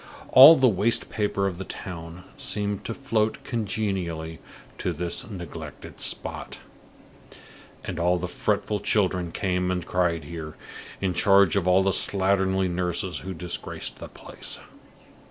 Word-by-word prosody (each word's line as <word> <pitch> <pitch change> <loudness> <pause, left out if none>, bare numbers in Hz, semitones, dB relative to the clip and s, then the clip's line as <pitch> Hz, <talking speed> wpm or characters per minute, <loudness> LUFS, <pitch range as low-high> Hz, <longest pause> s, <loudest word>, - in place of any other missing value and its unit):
All 140 +5 +10
the 130 -4 +4
waste 110 +1 +1
paper 105 -2 0
of 95 -2 -2
the - - -3
town 85 -2 -8
seemed 105 -1 -2
to 115 - -3
float 110 -5 -1
congenially 95 -8 -3 0.4
to - - -1
this 85 +4 -3
neglected 85 -6 -9
spot; - - -3 1.3
and 90 -2 -5
all 90 +1 +2
the 90 +1 -3
fretful 105 +3 -1
children 95 -4 0
came 90 0 -1
and 90 -2 -2
cried 85 -3 0
here, 75 0 -7 0.5
in 95 -2 0
charge 100 +3 +4
of 95 -2 +1
all 95 +1 +5
the 95 - +2
slatternly 95 -1 +2
nurses 90 0 -2
who 95 0 -6
disgraced 85 +1 -4
the - - -7
place. - - -5
95 Hz, 135 wpm, -25 LUFS, 85-100 Hz, 1.3 s, All